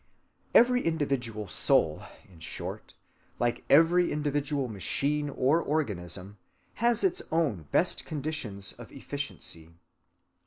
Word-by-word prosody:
Every 250 +1 +6
individual 135 -10 -1
soul, - - +3 0.3
in 90 -4 -18
short, 80 - -7 0.4
like 120 -1 0
every 170 +4 +5
individual 145 -2 -1
machine 140 - -1
or 140 +4 +2
organism, 100 - -3 0.4
has 235 -1 +3
its 375 0 +1
own 135 - 0
best - - +1
conditions 140 -10 -4
of - - -12
efficiency. 80 -1 -6
140 Hz, 105 wpm, -29 LUFS, 105-160 Hz, 0.4 s, Every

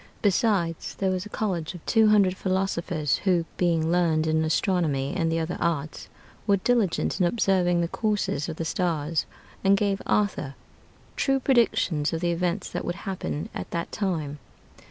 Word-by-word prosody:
Besides, 195 -5 +1
there 190 -1 0
was 185 +2 -2
a - - -15
college 180 -6 -2
of 175 - -11
two 220 -1 +4
hundred 200 -3 +4
philosophers, 185 -6 0
who, 180 -4 +1
being 165 -2 +1
learned 165 -3 +2
in 160 0 +2
astronomy 160 -4 0
and 165 -3 0
the 165 - +1
other 165 +1 -3
arts, 155 -2 -2 0.4
were 200 -1 +4
diligent 215 -3 +1
in 175 - +5
observing 180 -4 +2
the 170 - 0
courses 205 -7 -1
of 160 - -4
the 165 - -4
stars, 160 -2 -1 0.4
and 195 0 +5
gave 200 -1 0
Arthur 185 -10 0 0.6
true 270 -1 +1
predictions 205 - +2
of 165 - -2
the 175 -1 +1
events 180 +2 -1
that - - -3
would 175 - -3
happen 185 -4 -3
at - - -6
that 170 -1 -3
time. 160 -8 -2
175 Hz, 165 wpm, -26 LUFS, 160-195 Hz, 0.6 s, in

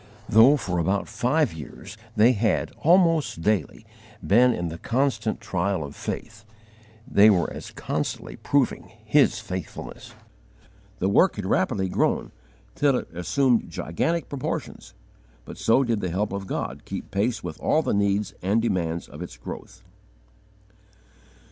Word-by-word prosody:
Though 115 +7 +6
for 90 -9 -2
about 95 +4 0
five 145 - +1
years 80 +5 -10 0.2
they 110 +3 +6
had, 110 -2 0
almost 165 - +3
daily, 105 +2 0 0.4
been 125 +5 +5
in 85 -7 -2
the 80 +1 -8
constant 120 -2 0
trial 95 -2 -1
of 70 0 -8
faith, 110 - -6 0.6
they 105 +2 +6
were 90 -5 +2
as - - -8
constantly - - -4
proving 140 -4 0
His - - +4
faithfulness. 95 -2 -7 0.8
The 95 - 0
work 175 - +4
had 105 - -5
rapidly 95 0 +1
grown, 90 - 0 0.4
till 140 -3 +2
it 85 - -7
assumed 115 +8 +1
gigantic 165 - -2
proportions, 140 -3 -5 0.5
but - - -10
so 130 +4 +4
did 115 -4 -1
the 90 - -2
help 100 +4 -1
of 100 -1 -4
God - - -4
keep - - -7
pace 110 +5 0
with 80 -3 -6
all 160 - +2
the - - 0
needs 100 0 +1
and 100 +5 +2
demands 90 -7 -1
of 75 - -11
its 90 -8 -8
growth. - - -9
105 Hz, 140 wpm, -25 LUFS, 90-125 Hz, 0.8 s, Though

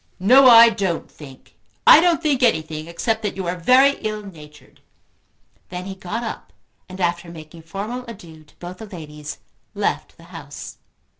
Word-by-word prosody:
"No, 255 +7 +6
I 230 0 +9
don't 195 -7 -3
think. 135 -4 -15 0.3
I - - +9
don't 340 -1 +1
think 285 -4 0
anything 160 -8 0
except 220 +6 -2
that 210 -2 -4
you 190 -1 -5
are 175 +1 -2
very 255 +10 +3
ill 215 -1 -4
natured." 150 -7 -15 0.9
Then 180 0 -7
he 195 - -6
got 190 +5 -6
up 225 - -7 0.4
and, 185 +1 -10
after 175 -1 -2
making 165 0 -12
formal 205 +10 -6
adieux 165 -8 -12
to - - -26
both 180 +1 -10
the 220 - -9
ladies, 150 -5 -9 0.4
left - - -3
the - - -17
house. - - -10
185 Hz, 165 wpm, -20 LUFS, 160-230 Hz, 0.9 s, I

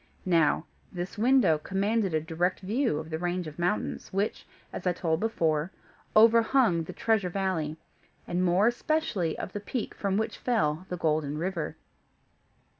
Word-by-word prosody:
Now 165 -3 +3 0.3
this 180 0 -5
window 230 - +4
commanded 200 +3 0
a - - +3
direct 170 +3 -1
view 220 - 0
of 160 +1 -6
the 160 - -2
range 175 +1 -2
of 155 +1 -9
mountains, 180 +5 -1
which, 200 +3 -2 0.3
as - - -4
I 180 - +3
told 165 -2 -1
before, 165 -7 0 0.5
overhung 225 -5 +5
the - - -7
Treasure 220 -5 +1
Valley, 175 -5 -2 0.5
and 175 +1 -1
more 180 +3 +3
especially 240 - 0
of - - -6
the 205 - -3
peak 220 +3 -4
from 195 -1 -1
which 220 - -2
fell 175 -7 0
the 180 - -3
Golden 150 -3 0
River. 170 -2 -3
180 Hz, 155 wpm, -28 LUFS, 160-215 Hz, 0.5 s, overhung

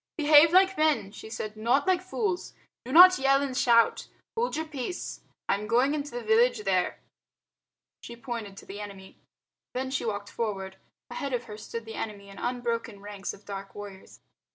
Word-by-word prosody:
"Behave 305 +1 +7
like 380 0 +4
men," 305 -11 +2
she 220 - -10
said, 215 -1 -5
"not 235 +6 +1
like 370 -1 +2
fools. 370 0 -3 0.3
Do 255 - -6
not 365 +4 +9
yell 275 +1 +3
and 270 -2 -3
shout. 235 -2 +3 0.3
Hold 465 -4 -1
your 320 +1 -2
peace. 310 +3 -5 0.3
I - - +3
am 205 +1 -3
going 250 +6 +3
into 295 -1 -3
the 245 -3 -6
village 225 +1 +3
there." 185 -2 +1 1.0
She 235 - -9
pointed 230 -5 -6
to - - -11
the 200 +1 -8
enemy. 195 -2 -10 0.6
Then 260 +1 -2
she 265 - -1
walked 205 -2 -4
forward. 195 -4 -4 0.3
Ahead 280 -3 -4
of 245 -1 -1
her 215 -3 -9
stood 230 +2 -7
the 225 - -8
enemy 205 -3 -6
in 195 - -11
unbroken 235 -3 -3
ranks 205 -1 -6
of 200 - -21
dark 195 -1 -7
warriors. 200 -2 -11
235 Hz, 180 wpm, -28 LUFS, 205-285 Hz, 1.0 s, not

